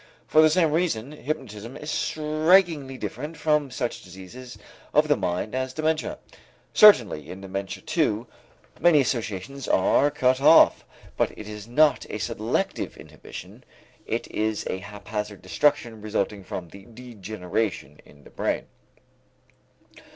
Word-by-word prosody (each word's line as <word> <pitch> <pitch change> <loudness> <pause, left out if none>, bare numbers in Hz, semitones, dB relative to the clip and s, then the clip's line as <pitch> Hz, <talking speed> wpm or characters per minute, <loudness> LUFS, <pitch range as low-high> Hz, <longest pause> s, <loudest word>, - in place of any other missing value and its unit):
For 155 - +5
the 155 - +6
same 160 -1 +3
reason, 150 -7 0
hypnotism 130 -6 -6
is 150 +1 -6
strikingly 155 -2 +2
different 150 +8 -6
from 150 -2 +1
such 125 -2 -3
diseases 95 +8 -11 0.4
of 150 +1 +5
the 145 - +4
mind 90 +1 -2
as 130 0 -3
dementia. 155 0 -1 0.6
Certainly 115 - +6
in 95 - -8
dementia 95 0 -5
too, 120 -9 0 0.5
many 170 -4 +5
associations 120 +1 -3
are 115 +9 +3
cut 130 -2 +1
off, 160 +3 +6 0.3
but - - 0
it 105 - -8
is 105 0 -8
not 145 +2 +3
a - - -4
selective - - -2
inhibition, - - -11 0.4
it - - -2
is 110 0 -1
a 95 - -3
haphazard 105 0 -6
destruction 120 +1 +1
resulting 105 -1 -2
from 90 -1 -6
the 100 +2 -13
degeneration 110 - -4
in 70 0 -19
the - - -16
brain. - - -2
120 Hz, 130 wpm, -25 LUFS, 100-150 Hz, 0.6 s, the